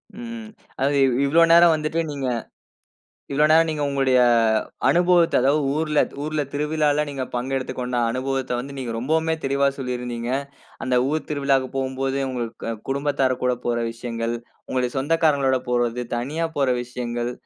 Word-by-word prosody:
ம். 230 Hz, -1 st, -7 dB, 0.3 s
அதாவது 140 Hz, +2 st, +1 dB
இ -, -, +3 dB, 0.2 s
இவ்ளோ 160 Hz, +5 st, +4 dB
நேரம் 170 Hz, 0 st, +7 dB
வந்துட்டு 155 Hz, +2 st, -2 dB
நீங்க. 140 Hz, -2 st, -3 dB, 1.0 s
இவ்ளோ 150 Hz, +2 st, +3 dB
நேரம் 165 Hz, +1 st, +5 dB
நீங்க 150 Hz, -2 st, -2 dB
உங்களுடைய 135 Hz, -2 st, +2 dB, 0.7 s
அனுபவத்த, 175 Hz, -1 st, +4 dB
அதாவது 140 Hz, +4 st, +3 dB
ஊர்ல 155 Hz, -1 st, +1 dB, 0.2 s
ஊர்ல 155 Hz, 0 st, -1 dB
திருவிழாவில 150 Hz, 0 st, +1 dB
நீங்க 135 Hz, -2 st, -4 dB
பங்கெடுத்துக்கொண்ட 125 Hz, -1 st, -3 dB
அனுபவத்த 130 Hz, +1 st, -2 dB
வந்து 140 Hz, +2 st, -7 dB
நீங்க 125 Hz, -3 st, -4 dB
ரொம்பவுமே 160 Hz, +5 st, +1 dB
தெளிவ 140 Hz, +1 st, +2 dB
சொல்லியிருந்தீங்க. 125 Hz, -2 st, -4 dB, 0.5 s
அந்த 130 Hz, -1 st, 0 dB
ஊர் 155 Hz, +1 st, -2 dB
திருவிழாவுக்கு 140 Hz, -3 st, +1 dB
போம்போது, 135 Hz, 0 st, -1 dB
உங்க 125 Hz, -2 st, -2 dB, 0.3 s
அ 115 Hz, -, -1 dB, 0.2 s
குடும்பத்தாருகூட 135 Hz, -2 st, 0 dB
போற 120 Hz, -1 st, 0 dB
விஷயங்கள், 115 Hz, 0 st, -4 dB, 0.3 s
உங்களுடைய 125 Hz, -1 st, -1 dB
சொந்தக்காரஙு்களோட 140 Hz, -3 st, +2 dB
போறது, 120 Hz, 0 st, 0 dB
தனியா 145 Hz, +8 st, -2 dB
போற 135 Hz, -2 st, +2 dB
விஷயங்கள், 120 Hz, 0 st, -4 dB
135 Hz, 135 wpm, -23 LUFS, 125-155 Hz, 1.0 s, நேரம்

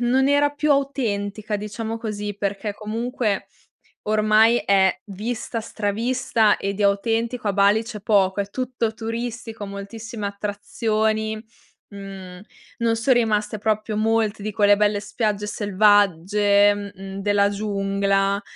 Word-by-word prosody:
non 260 Hz, +3 st, +2 dB
era 285 Hz, 0 st, +3 dB
più 295 Hz, +1 st, -1 dB
autentica 215 Hz, -7 st, -1 dB
diciamo 220 Hz, +2 st, -5 dB
così, 210 Hz, -2 st, -5 dB
perché 200 Hz, +1 st, -3 dB
comunque 220 Hz, 0 st, -2 dB, 0.6 s
ormai 215 Hz, +2 st, +4 dB
è 190 Hz, -2 st, +2 dB
vista, 225 Hz, +4 st, -4 dB
stravista, 225 Hz, +1 st, +1 dB
e 200 Hz, 0 st, -3 dB
di 210 Hz, -, -3 dB
autentico 225 Hz, +3 st, 0 dB
a 200 Hz, -, +2 dB
Bali 205 Hz, +3 st, +3 dB
c'è 220 Hz, -2 st, -7 dB
poco. 200 Hz, -2 st, +2 dB
È 200 Hz, -, -4 dB
tutto 245 Hz, -2 st, -2 dB
turistico 225 Hz, -1 st, -5 dB
moltissime 205 Hz, +2 st, -6 dB
attrazioni 215 Hz, +2 st, -1 dB, 0.5 s
mhmm, 195 Hz, -2 st, -9 dB, 0.4 s
non 230 Hz, -1 st, +1 dB
son 250 Hz, +3 st, +3 dB
rimaste 215 Hz, -2 st, 0 dB
proprio 215 Hz, 0 st, -1 dB
molte 220 Hz, -1 st, +1 dB
di 215 Hz, -, -3 dB
quelle 205 Hz, 0 st, +4 dB
belle 210 Hz, 0 st, +2 dB
spiagge 210 Hz, 0 st, -2 dB
selvagge, 205 Hz, 0 st, +3 dB
mhmm, 195 Hz, -1 st, -7 dB
della 205 Hz, 0 st, +3 dB
giungla. 200 Hz, -1 st, 0 dB
210 Hz, 125 wpm, -22 LUFS, 200-225 Hz, 0.6 s, ormai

